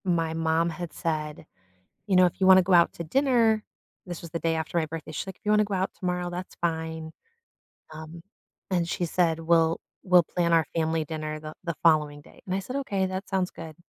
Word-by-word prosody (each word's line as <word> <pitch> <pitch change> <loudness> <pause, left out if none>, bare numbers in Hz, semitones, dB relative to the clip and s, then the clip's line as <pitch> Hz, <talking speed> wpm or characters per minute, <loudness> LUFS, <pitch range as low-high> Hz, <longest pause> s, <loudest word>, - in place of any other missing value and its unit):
My 165 -3 +1
mom 165 +1 +1
had 170 -1 -6
said, 155 -2 -3 0.6
"You 195 -3 +2
know, 185 0 +7
if 175 - -4
you 190 - +4
wanna 190 0 +8
go 185 +1 +2
out 170 -1 +5
to 170 - -6
dinner" 230 - +2 0.4
this 175 -2 -6
was 170 - -9
the 170 - -3
day 165 0 0
after 160 +1 -2
my 160 - 0
birthday, 155 0 -7
she - - -3
like, 190 - -9
"You 210 - +1
wanna 210 0 +4
go 205 -1 -3
out 190 0 -1
tomorrow, 180 -1 -2
that's 180 +1 -6
fine," 160 -1 -3 0.8
um, 160 +2 -9 0.5
and 175 -2 +1
she 175 - -1
said, 165 -1 +1
"We'll 165 0 +3 0.2
we'll 180 -2 +5
plan 170 +1 0
our 165 -2 +4
family 160 -1 0
dinner 155 0 -4
the 155 0 -8
the 170 -2 -3
following 150 -3 +3
day," - - -19
and 185 - -1
I - - 0
said, 250 +7 -6
"Okay, 200 -9 -1
that 190 +1 -5
sounds 190 -1 0
good." 160 -1 -9
170 Hz, 215 wpm, -26 LUFS, 160-185 Hz, 0.8 s, wanna